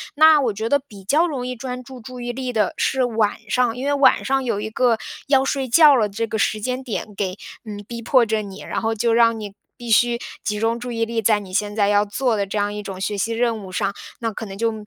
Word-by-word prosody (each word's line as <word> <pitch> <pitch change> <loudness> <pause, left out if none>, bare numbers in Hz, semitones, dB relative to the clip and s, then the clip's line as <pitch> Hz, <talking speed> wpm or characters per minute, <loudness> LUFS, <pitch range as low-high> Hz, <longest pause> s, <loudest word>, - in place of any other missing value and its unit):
那 310 0 +7
我 245 -4 +1
觉 220 +3 -3
得 285 +4 +3
比 210 -8 -14
较 305 - +3
容 270 -6 -4
易 250 0 -4
专 250 +1 -6
注 255 0 -11
注 250 +3 -9
意 240 0 -3
力 255 0 -4
的 215 -4 +1
是 265 -1 +1
晚 220 -3 +1
上， 250 -2 +1
因 260 - -4
为 285 - +1
晚 275 -2 +4
上 270 0 +1
有 230 -5 -1
一 220 +1 -5
个 240 0 +2 0.3
要 270 -1 +4
睡 270 -1 -1
觉 300 +2 +7
了 215 -5 +2
这 225 +3 -2
个 220 0 -3
时 215 0 +1
间 255 +4 -3
点 215 -3 -5
给 190 -1 -3 0.3
嗯， 205 -1 -7
逼 235 -1 -6
迫 245 +1 +4
着 220 -1 0
你， 195 -2 -9
然 - - -3
后 225 0 0
就 230 +1 +1
让 230 -1 +4
你 205 -2 -7 0.2
必 240 -1 -8
须 240 +2 +4 0.3
集 210 - -2
中 230 +1 0
注 245 0 -6
意 230 0 -1
力 230 0 -2
在 215 0 +3
你 190 -2 -11
现 205 +1 -1
在 205 -2 +2
要 205 0 +3
做 235 +2 0
的 200 - 0
这 200 - -4
样 205 0 0
一 210 - -5
种 195 -2 -7
学 205 +1 -2
习 225 +4 -1
任 230 -1 0
务 185 - -10
上， 195 +2 -1 0.3
那 225 -2 -2
可 220 - -6
能 195 -1 -8
就 230 +2 +1
230 Hz, 285 characters per minute, -21 LUFS, 210-250 Hz, 0.3 s, 那